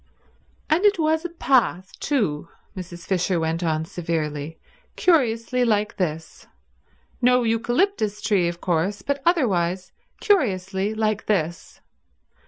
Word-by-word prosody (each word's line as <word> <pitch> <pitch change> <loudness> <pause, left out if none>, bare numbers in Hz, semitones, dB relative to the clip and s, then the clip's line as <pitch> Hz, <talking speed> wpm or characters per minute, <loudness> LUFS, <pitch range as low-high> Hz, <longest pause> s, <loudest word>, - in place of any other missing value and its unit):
"And 325 +5 +2
it 410 -1 +4
was 320 +1 +1
a - - -2
path, 245 - +1
too," 190 - -1 0.3
Mrs. 175 -2 -8
Fisher 180 -1 0
went 165 +1 -1
on 160 -2 0
severely, 160 -2 -4 0.4
"curiously 250 -6 +2
like 210 -3 0
this. 160 -3 -4 0.7
No 250 0 +4
eucalyptus 230 - 0
tree, 190 -5 +1
of 170 0 -4
course, 185 +4 -1
but 280 0 -2
otherwise 185 - +1 0.3
curiously 200 - +1
like 215 -1 -1
this. 170 -5 -2
205 Hz, 115 wpm, -23 LUFS, 170-250 Hz, 0.7 s, it